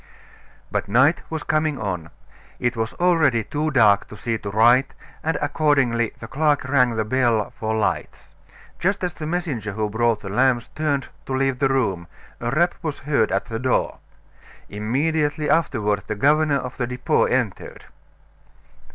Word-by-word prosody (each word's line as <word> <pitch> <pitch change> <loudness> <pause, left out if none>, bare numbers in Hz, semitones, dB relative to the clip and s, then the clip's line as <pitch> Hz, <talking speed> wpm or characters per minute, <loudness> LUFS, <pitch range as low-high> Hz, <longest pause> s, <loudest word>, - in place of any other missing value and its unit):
But - - -1
night 130 - +3
was 160 -1 -4
coming 155 -2 0
on. 90 -7 -4 0.5
It 120 +1 0
was 110 -1 -2
already 160 -10 +3
too 150 +7 -2
dark 110 -8 +4
to 105 - -11
see 115 +3 -2
to 100 - -6
write, 120 +6 +4 0.3
and 160 +1 0
accordingly 130 -7 +1
the 115 - -8
clerk 150 +3 +1
rang 130 -3 +2
the 110 -1 -1
bell 115 -2 +1
for 110 0 -1
lights. 110 - -3 0.5
Just 195 +2 0
as 180 -2 -1
the 155 0 -6
messenger 150 - -3
who 105 0 -2
brought 115 0 +1
the 95 - -7
lamps 120 +2 +1
turned 145 -4 -1 0.2
to 130 - -2
leave 135 -1 0
the 135 - +2
room, 100 -10 0 0.3
a 120 - -2
rap 170 +7 +2
was 155 -4 -3
heard 135 -6 +1
at 100 0 0
the 115 0 -5
door. 130 +1 0 0.7
Immediately 145 +8 -1
afterward 110 -10 +1
the 105 - -2
governor 145 +5 +3
of 130 -1 -6
the 120 - -1
Depot 125 0 +1
entered. - - -2
130 Hz, 160 wpm, -22 LUFS, 110-150 Hz, 0.7 s, dark